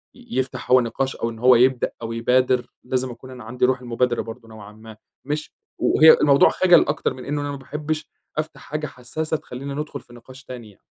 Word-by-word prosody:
ي 245 -1 -17
يفتَح 130 -1 -3
هو 130 - +8
النِّقاش 130 +3 -2
أو 115 - -2
إن 115 -1 -9
هو 125 +1 +6
يبدأ 125 +1 +3
أو 115 - -5
يبادر، 125 +2 +2 0.2
لازم 130 0 -2
أكون 125 +2 -12
أنا 125 -3 -10
عَندي 125 +3 0
رُوح 130 0 +1
المبادرة 120 0 0
برضه 115 +1 -10
نوعًا 105 -2 -11
ما، 110 0 -13 0.3
مش 150 +2 -3 0.3
وهي 160 0 +7
الموضوع 140 -1 +6
خجَل 180 -3 +4
أكتر 145 - -1
من 130 - -10
إنه 145 +1 -2
أنا 145 0 -3
ما 140 - -5
باحبش 150 +2 -5 0.3
أفتح 155 0 -4
حاجة 150 0 -4
حسّاسة 155 +6 -4
تخلّينا 140 +2 -7
ندخُل 150 -1 -5
في 120 - -19
نِقاش 130 +3 -14
تاني 120 -3 -9
يعني. 100 - -20
130 Hz, 210 wpm, -22 LUFS, 120-145 Hz, 0.3 s, هو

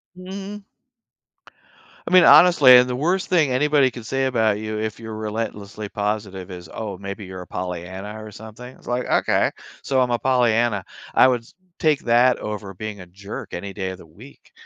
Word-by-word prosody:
Mm. 195 +2 -8 1.4
I - - -4
mean, 185 - +8
honestly, 135 -8 +8
the 125 0 -4
worst 175 +8 -1
thing 160 -6 +3
anybody 145 +1 +3
could 120 -2 -10
say 135 +3 -1
about 110 -5 +1
you 110 0 -4
if 110 0 -4
you're 110 -1 -7
relentlessly 110 -1 -5
positive 100 -3 -4
is, 90 -2 -9
"Oh, 105 -4 -6
maybe, 100 +1 -7
you're 95 0 -8
a 90 - -11
Pollyanna 95 +4 -6
or 110 - -10
something." 110 +4 -11
It's - - -22
like, 125 +1 -1
"Okay, - - +2 0.3
so 135 -1 0
I'm 125 -1 +2
a 120 - 0
Pollyanna, 120 -5 +1 0.3
I - - +7
would 125 -2 0 0.4
take 155 -3 +2
that 120 +1 +3
over 105 -2 -6
being 105 +1 -6
a 90 - -12
jerk 100 +3 -8
any 100 +2 -6
day 95 -2 -4
of 95 - -7
the 90 - -15
week." 105 - -17
110 Hz, 180 wpm, -22 LUFS, 100-130 Hz, 1.4 s, mean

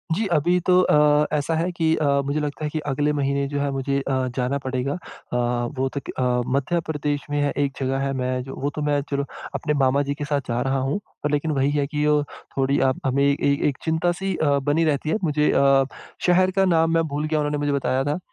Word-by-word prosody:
जी 220 - 0
अभी 175 +4 +2
तो 180 0 +6
अ, 150 -2 +4
ऐसा 150 +2 0
है 170 +3 0
कि 165 -2 +1
अ, 155 - -1 0.2
मुझे 140 +2 -1
लगता 150 +1 -4
है - - -1
कि 155 - -3
अगले 145 +1 0
महीने 140 -1 0
जो 145 +1 -3
है 140 0 0
मुझे 140 +1 -1
अ, 130 -1 -1
जाना 130 +2 0
पड़ेगा। 130 +2 -2
अ, 160 -7 -7 0.4
वो 135 +1 +1
तो - - +2 0.4
अ, - - +1
मध्य 170 +5 0
प्रदेश 145 -1 -2
में 145 0 0
है 145 -1 +1
एक 140 -1 0
जगह 135 0 -1
है 135 0 -1
मैं 130 -1 -1
जो 135 - -8
वो 140 - 0
तो 150 - -3
मैं 145 -1 +1
चलो 140 0 0 0.3
अपने 150 - -1
मामाजी 140 +2 +2
के 145 0 -4
साथ 145 -1 0
जा 120 0 -1
रहा 135 0 0
हूँ। 135 +8 -1 0.3
लेकिन 150 +2 0
वही 140 -1 +1
है 145 -1 +1
कि 150 0 -2
अ, 150 0 +3 0.4
थोड़ी 135 +1 +2
आप 130 - -2
हमें 135 +1 +2
ए 140 0 +2
एक 140 - -1
चिंता 160 +2 +1
सी 190 +1 -3
अ, 145 -3 +2
बनी 145 +4 +1
रहती 150 0 0
है। 160 - +2
मुझे 150 -2 +2
अ, 135 0 +4 0.4
शहर 185 +1 +4
का 195 0 +2
नाम 165 -2 +3
मैं 165 - +3
भूल 145 +1 -2
गया 155 0 0
उन्होंने 150 0 -1
मुझे 145 0 0
बताया 135 -1 0
था। 145 +5 -1
145 Hz, 235 wpm, -23 LUFS, 135-155 Hz, 0.4 s, तो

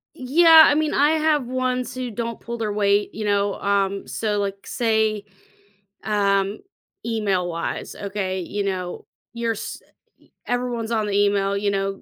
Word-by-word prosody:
Yeah, 320 +4 +7
I - - +4
mean, 310 0 0
I 295 +2 +3
have 310 -4 +1
ones 255 0 -2
who 255 -1 -4
don't 230 +1 -4
pull 235 0 -6
their 215 -2 -2
weight, 205 0 +1
you 215 - -5
know, 200 -1 +1
um, 200 -1 0
so, 210 -2 -1
like, 200 -1 -4
say, 220 -3 0 0.8
um, 200 -1 +1 0.5
email-wise, 190 -7 -2
okay, 190 -2 -3
you 200 +4 -3
know, 185 -2 -4 0.3
you're 235 -1 -1
s 220 - -7 0.6
everyone's 245 -2 -2
on 220 -2 0
the 205 - -2
email, 200 -1 +2
you 200 0 0
know, 195 0 -2
210 Hz, 150 wpm, -22 LUFS, 200-240 Hz, 0.8 s, Yeah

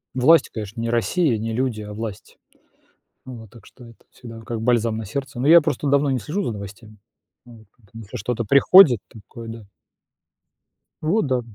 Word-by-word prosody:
Власть, 160 +6 +4
конечно, 110 0 -8
не 115 0 -3
Россия, 120 +3 0
не 115 +1 -4
люди, 120 -2 -2
а 105 0 -9
власть. 105 -2 -8 0.9
Вот. 115 -4 -11
Так 115 +1 -18
что 125 - -17
это 115 -1 -15
вот - - -31
всегда 115 -2 -12
как 115 0 -6
бальзам 115 -1 +1
на 110 - -6
сердце. 135 +4 -6
Но 130 - -1
я 170 +2 +8
просто 145 -2 -3
давно 140 0 +2
не 130 - -1
слежу 160 - -4
за - - -3
новостями. 105 +1 -11 0.5
Вот. 115 -2 -16
Поэтому 115 0 -14
если 100 - -9
что-то 115 +2 -3
приходит, 140 - +6
такое 115 +2 -12
да. 115 -2 -10 1.4
Вот 165 +1 0
да. 130 -2 0
115 Hz, 180 wpm, -21 LUFS, 110-135 Hz, 1.4 s, я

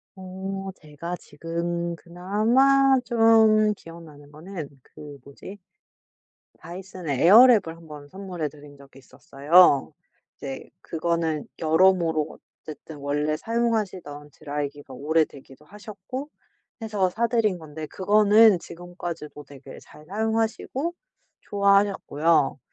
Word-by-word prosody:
어 190 +1 -6
제가 155 +3 -7
지금 170 +3 -4
그나마 235 +11 +2
좀 220 -2 +4
기억나는 155 -5 -14
거는 160 -1 -8
그 145 +1 -13
뭐지? 165 +8 -12 1.0
다이슨의 175 -5 -6
에어랩을 215 -5 +7
1 165 -1 -16
번 145 -1 -11
선물해 185 -6 -5
드린 145 0 -15
적이 135 -1 -17
있었어요. 140 +3 +3 0.4
이제 135 -1 -8
그거는 165 -2 -2
여러모로 160 -1 +2 0.3
어쨌든 155 0 -10
원래 150 +2 -2
사용하시던 190 -11 -3
드라이기가 145 -2 -6
오래되기도 145 -1 -2
하셨고 210 - -9 0.5
해서 205 -4 0
사드린 225 -2 0
건데 155 0 -8
그거는 210 0 +4
지금까지도 170 -4 -8
되게 140 -1 -13
잘 150 - -17
사용하시고 225 - -2 0.5
좋아하셨고요. 200 -8 +1
170 Hz, 260 characters per minute, -24 LUFS, 150-205 Hz, 1.0 s, 에어랩을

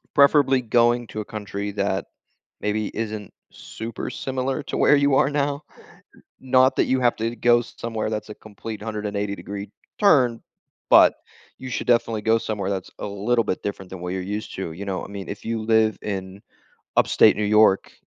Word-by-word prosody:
preferably 140 -2 +5
going 120 +1 +2
to 110 - -7
a 105 - -4
country 100 -1 -5
that 100 -1 -1 0.6
maybe 105 0 -1
isn't 110 -2 -5 0.2
super 115 0 -7
similar 130 +1 -3
to - - -4
where 145 - +5
you 140 -1 +3
are 135 - +3
now. 145 0 -1 0.8
Not 130 0 +3
that - - +3
you 130 0 +1
have 120 -1 +2
to 115 +2 -2
go 120 0 +3
somewhere 115 -2 -5
that's 105 0 -4
a 105 - -7
complete 110 0 -9
180 105 -2 -3
degree 100 0 -7 0.3
turn, 130 - +4 0.5
but - - +7 0.4
you 130 - -7
should - - -3
definitely 115 -3 +2
go 115 +1 +3
somewhere 100 -3 -3
that's 95 -2 -4
a - - -4
little 105 +4 0
bit 95 - -3
different 95 -2 -5
than 95 -2 -8
where 90 0 -4
you're 95 -1 -3
used 105 +3 -5
to, 90 -4 -4
you 95 +5 -7
know? 95 -2 -3
I - - -11
mean, 100 -1 -7
if 100 - -7
you 115 -1 -2
live 110 -1 +2
in 95 -1 -5 0.6
Upstate - - +5
New 105 - -1
York, 105 -2 +4
110 Hz, 185 wpm, -23 LUFS, 100-120 Hz, 0.8 s, but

